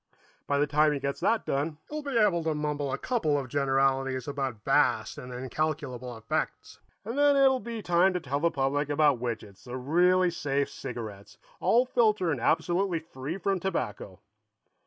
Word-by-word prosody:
By 140 - +1
the 145 - +3
time 150 +1 +3
he 140 - -2
gets 140 0 -3
that 225 -1 +1
done, 150 +3 -1
he'll 305 0 -5
be 280 -4 -2
able 180 -7 +3
to 160 -1 0
mumble 150 -2 -2
a 135 - -1
couple 160 - 0
of 135 -2 -3
generalities 135 -1 +1
about 135 -6 -3
vast - - +2
and 125 - -9
incalculable 130 -1 -3
effects, 110 0 -3 0.3
and 230 +3 -4
then 290 0 +4
it'll 265 -1 +5
be 230 -3 -6
time 175 +2 +4
to 180 - -1
tell 140 -3 -2
the 170 +3 +2
public 145 0 -1
about 145 -3 +3
Widgets, 110 -5 -5
the 125 0 -5
really 180 +7 +3
safe 140 -3 -1
cigarettes, 110 -5 -8 0.2
all 245 +2 +3
filter 215 -8 +2
and 130 -6 -2
absolutely 175 +6 +1
free 160 0 -6
from 195 0 0
tobacco." 105 - -4
145 Hz, 175 wpm, -28 LUFS, 130-180 Hz, 0.3 s, it'll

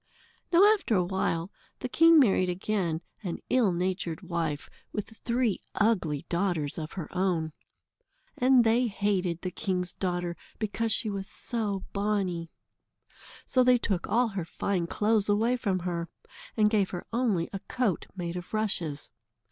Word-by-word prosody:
Now, 350 +2 +7
after 390 - 0
a 180 - +3
while, 180 -1 -1 0.3
the - - -1
king 330 +5 +6
married 195 -9 +4
again 180 -3 -1 0.2
an 180 -5 -3
ill 240 -7 +4
natured 180 -2 -2
wife, 165 -4 -2 0.2
with 210 - -4
three 235 0 0 0.2
ugly 180 -10 +1
daughters 170 -5 -1
of 155 0 -6
her 170 -6 -5
own. 175 -4 0 0.8
And 255 -1 +5
they 235 +2 +3
hated 195 -5 0
the 185 - -2
king's 180 -1 -2
daughter 175 -2 -2 0.2
because 220 +1 -1
she 220 0 0
was 195 0 -4
so 210 -5 -3
bonny. 195 -5 -1 1.0
So 255 -1 +3
they 250 0 +6
took 195 -6 -1
all 235 +3 +3
her 195 -4 -3
fine 175 +1 -2
clothes 210 +2 +1
away 225 +4 +3
from 200 -6 0
her, 170 -2 -3 0.5
and 215 -1 +5
gave 205 -4 +2
her 175 - -5
only 220 -9 +1
a 195 - -3
coat 235 -5 -1
made 175 -2 -4
of 180 +4 -5
rushes. 180 -9 -2
195 Hz, 150 wpm, -28 LUFS, 175-220 Hz, 1.0 s, Now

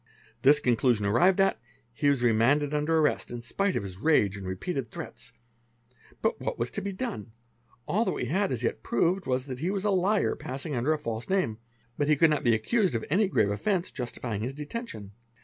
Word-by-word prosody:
This 145 +2 +6
conclusion 120 -3 +2
arrived 175 - +4
at, 195 -13 +3 0.3
he 145 +5 +1
was 140 -3 +1
remanded 130 +6 +3
under 150 +2 +2
rrest, 150 -2 +1
in 120 -1 -6
spite 195 +10 -1
of - - -1
his 95 -2 -8
rage 105 -9 +3
and 95 -2 -7
repeated 120 - -3
threats. 115 - -8 0.9
But - - 0
what - - -3
was 115 - -2
to 205 - -3
be 200 +1 -3
done? 185 - -5 0.5
All 215 +4 +2
that - - 0
we - - -3
had 190 - 0
as 125 -2 -2
yet 115 - -1
proved 170 - 0
was 130 0 0
that 130 -3 -6
he 170 +6 -1
was 195 -1 -2
a 210 - +2
liar 195 +2 +2
passing 135 +4 -5
under 125 +5 +1
a 155 - +2
false 115 -4 -5
name, 185 - 0 0.4
but 145 - +1
he 150 - +4
could 160 +2 +4
not 150 - 0
be 120 -2 +4
accused 190 - +1
of 115 - -2
any 200 +5 +3
grave 110 - +2
offence 185 - -1
stifying 120 -4 -4
his 130 +4 -3
detention. 150 - -6
140 Hz, 210 wpm, -28 LUFS, 115-180 Hz, 0.9 s, This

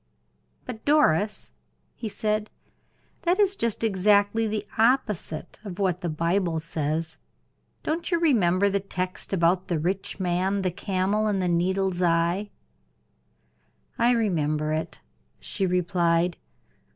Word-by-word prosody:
"But 230 -3 -7
Doris," 215 - +2 0.4
he 225 - -5
said, 215 +1 -1 0.7
"that 350 +2 +2
is 400 -2 +3
just 230 - -1
exactly 205 +1 +3
the 210 -1 -2
opposite 220 - 0
of 190 -4 -7
what 185 -2 0
the 175 - -2
Bible 170 +1 0
says. 160 0 -3 0.7
Don't 325 +2 -2
you 340 -3 +2
remember 200 - +3
the 200 0 +1
text 185 -1 -4
about 180 0 +2
the 175 -4 0
rich 185 +5 -2
man, 185 +2 0
the 185 - 0
camel, 195 +3 0
and 205 -2 0
the 180 - 0
needle's 185 +1 0
eye?" 170 +4 +1 1.5
"I 235 +1 +4
remember 155 -9 0
it," 160 +1 -4 0.4
she 195 -3 -2
replied. 175 -1 +1
190 Hz, 125 wpm, -26 LUFS, 170-215 Hz, 1.5 s, I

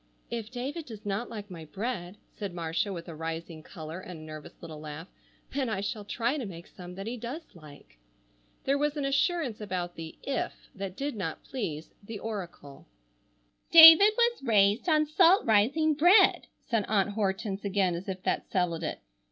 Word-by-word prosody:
"If 230 -2 -4
David 275 +6 -5
does 215 -4 -10
not 205 +4 -2
like 210 -3 -8
my 165 -3 -8
bread," 195 +1 -5 0.2
said 195 -4 -6
Marcia 165 +4 -2
with 170 -2 -7
a 170 - -7
rising 165 0 -6
color 160 +1 -8
and 180 -3 -9
a - - -11
nervous 155 -1 -10
little 160 -2 -9
laugh, 155 +3 -8 0.5
"then 270 -3 -1
I 205 -3 -2
shall 205 +1 -4
try 240 +7 -1
to 255 - -4
make 170 -2 -9
some 180 -1 -11
that 195 +1 -7
he 240 +3 -4
does 245 +8 -6
like." 145 - -16 0.6
There 280 +1 +1
was 295 +1 0
an 285 - -1
assurance 275 - 0
about 180 -4 -4
the 165 -1 -9
"if" 275 -1 -4
that 195 -1 -6
did 280 -2 -3
not 175 -6 -5
please 160 - -5
the 210 +2 -7
oracle. 185 -10 -7 0.8
"David 330 +5 +10
was 475 0 +2
raised 215 - +3
on 305 -1 +4
salt 340 +5 +4
rising 265 +9 +3
bread," 350 +8 +5 0.2
said 230 -3 +1
Aunt 205 -1 +1
Hortense 200 -1 -2
again 195 -3 +1
as 175 +4 -6
if 190 -1 -5
that - - -1
settled 175 -3 0
it. - - -4
205 Hz, 180 wpm, -29 LUFS, 175-260 Hz, 0.8 s, David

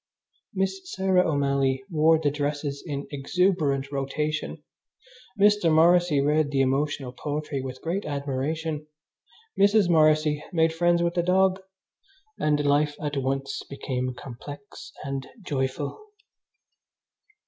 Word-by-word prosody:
Miss 190 0 -1
Sarah 190 -2 +2
O'Malley 140 -1 +1
wore 160 0 +4
the 150 -2 0
dresses 145 -1 -3
in 145 -3 -4
exuberant 145 -2 0
rotation, 150 +3 -3 0.8
Mr. 205 -4 +4
Morrissy 170 -1 +4
read 150 +1 +2
the 140 -2 +1
emotional 135 0 0
poetry 145 +1 -4
with 130 0 -7
great 180 +5 -2
admiration, 150 +2 -3 0.7
Mrs. 200 -1 +4
Morrissy 155 -2 +3
made 160 -2 +2
friends 170 +1 +2
with 170 0 0
the 175 - +1
dog, 190 +2 +2 0.8
and 150 -1 +1
life 145 +1 +2
at 145 -1 -3
once 135 0 -2
became 130 -2 -3
complex 140 +3 -10
and 135 -1 -4 0.2
joyful. 140 - -3
150 Hz, 115 wpm, -26 LUFS, 140-170 Hz, 0.8 s, wore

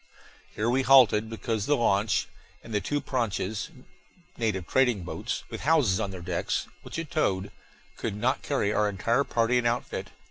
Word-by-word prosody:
Here 105 - -1
we 125 +3 +3
halted, 125 -5 +5
because 110 -2 -3
the 145 - +3
launch, 105 -2 +2 0.4
and 115 - -9
the 105 - +1
two 145 +9 -1
pranchas 110 - -2 0.7
native 105 -6 -1
trading 125 -4 +2
boats - - -4
with - - -6
houses 140 -11 +3
on 100 - -1
their 95 -2 -7
decks 90 -1 -1 0.2
which - - -8
it 165 -2 -5
towed, 100 -9 0 0.5
could 110 -3 -3
not 125 +6 0
carry 110 -8 0
our 105 -1 +2
entire 115 +7 +1
party 120 -1 +2
and 120 - +1
outfit. 120 +1 -2
115 Hz, 170 wpm, -27 LUFS, 100-130 Hz, 0.7 s, halted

